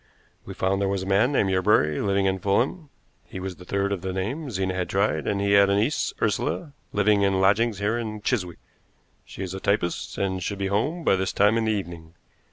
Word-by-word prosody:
We - - -8
found 95 +1 0
there 100 - +1
was 95 -1 -1
a - - -6
man 100 +7 +3
named 100 -8 +2
Yerbury 95 -5 +2
living 100 -1 +1
in 95 0 0
Fulham; 130 - 0 0.4
he - - -7
was 95 -1 -6
the 90 - -13
third 100 +2 -1
of 100 -3 -2
the 95 0 -3
name 120 - -3
Zena 95 -4 -2
had 90 -1 -3
tried, 100 +2 0
and 100 - 0
he 100 0 0
had 100 0 +6
a 100 - +3
niece, 110 +9 0
Ursula, 115 - -1 0.2
living 105 0 +3
in 100 -1 +2
lodgings 105 +3 +3
here 105 +4 0
in 110 -2 -5
Chiswick. 90 -9 -1 0.7
She 95 - -7
is 95 -1 -5
a 95 - -5
typist, 100 -3 -1
and 95 -1 -1
should 100 +3 -3
be 95 0 -2
home 155 - 0
by - - +4
this 95 0 -1
time 105 +2 +3
in 115 -1 +1
the 110 - +1
evening. 85 -5 -6
100 Hz, 225 wpm, -25 LUFS, 95-105 Hz, 0.7 s, had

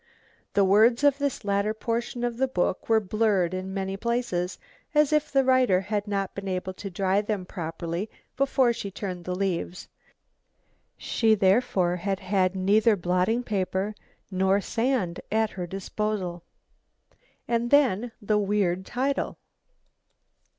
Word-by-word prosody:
The 200 - +5
words 225 +7 +4
of 285 -1 +4
this 280 -5 -2
later 200 +2 0
portion 235 +2 -3
of 240 -1 -1
the 265 +1 +2
book 185 -5 -1
were 225 -1 +5
blurred 205 -3 +1
in 185 +1 -4
many 195 0 -3
places, 230 -5 -1 0.4
as 300 0 +4
if 300 0 +1
the 270 -1 +4
writer 255 -8 +4
had 205 +1 -2
not 195 -2 -2
been 200 0 -6
able 185 0 -3
to 195 +2 -7
dry 190 +2 +1
them 210 -3 -3
properly 170 +2 -4 0.3
before 265 -3 +2
she 200 - -5
turned 185 -3 -6
the 180 - -2
leaves. 185 -1 -3 1.1
She 220 -2 +2
therefore 190 -3 +2
had 195 +1 -2
had 190 -1 +1
neither 210 +4 +4
blotting 185 +6 +1
paper 195 -1 -1 0.4
nor 190 +1 +2
sand 225 -5 -1
at 220 0 +1
her 180 -2 -5
disposal. 195 -1 -3 1.1
And 235 0 0
then 245 -5 +3
the 210 -1 +1
weird 195 -3 0
title! 270 +3 -1
200 Hz, 140 wpm, -26 LUFS, 185-230 Hz, 1.1 s, The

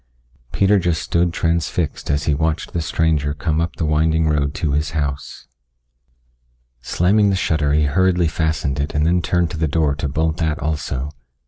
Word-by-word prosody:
Peter 100 +1 +3
just 85 -3 0
stood 85 +2 0
transfixed 85 -2 -1
as 70 0 +1
he 75 - +1
watched 80 +2 -1
the 85 - -1
stranger 75 -2 0
come 80 +2 -1
up 85 0 -2
the 80 - -2
winding 80 +1 +2
road 75 -1 0
to 75 -2 -1
his 75 +2 -1
house. 70 -2 -4 1.4
Slamming 100 - +2
the 95 - +1
shutter 75 -5 0
he 75 0 +3
hurriedly 90 +3 +2
fastened 80 -3 -1
it 70 +1 -3
and 75 +1 +2
then 90 +2 +2
turned 85 -1 0
to - - -5
the 80 0 0
door 75 -1 +1
to 70 0 -3
bolt 80 +3 -1
that 80 -2 0
also. 75 -3 -3
80 Hz, 180 wpm, -20 LUFS, 75-85 Hz, 1.4 s, Peter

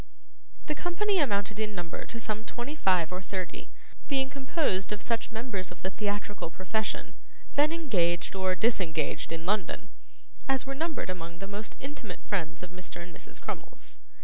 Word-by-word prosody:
The 305 - +1
company 370 +5 +2
amounted 210 -6 +2
in 215 -1 0
number 175 -3 -3
to 230 - -3
some 215 -1 -1
twenty 240 +5 -3
five 185 - +4
or 180 +1 -2
thirty, 185 -2 -3 0.4
being 265 -2 +3
composed 260 - +2
of 210 - 0
such 230 +2 0
members 220 -5 -1
of 180 - -11
the 190 - +1
theatrical 205 -3 -1
profession, 205 +5 -1 0.4
then 295 +2 +6
engaged 185 - +2
or 190 -1 +2
disengaged 180 -10 +2
in 165 0 -2
London, 210 +2 +1 0.6
as 270 -1 +3
were 275 - -1
numbered 315 - 0
among 170 -1 -5
the 195 - -4
most 205 +2 -4
intimate 265 -9 -5
friends 180 -4 -1
of 180 - -6
Mr. 185 -1 -4
and 175 0 -7
Mrs. - - -7
Crummles. - - -5
205 Hz, 165 wpm, -31 LUFS, 185-260 Hz, 0.6 s, then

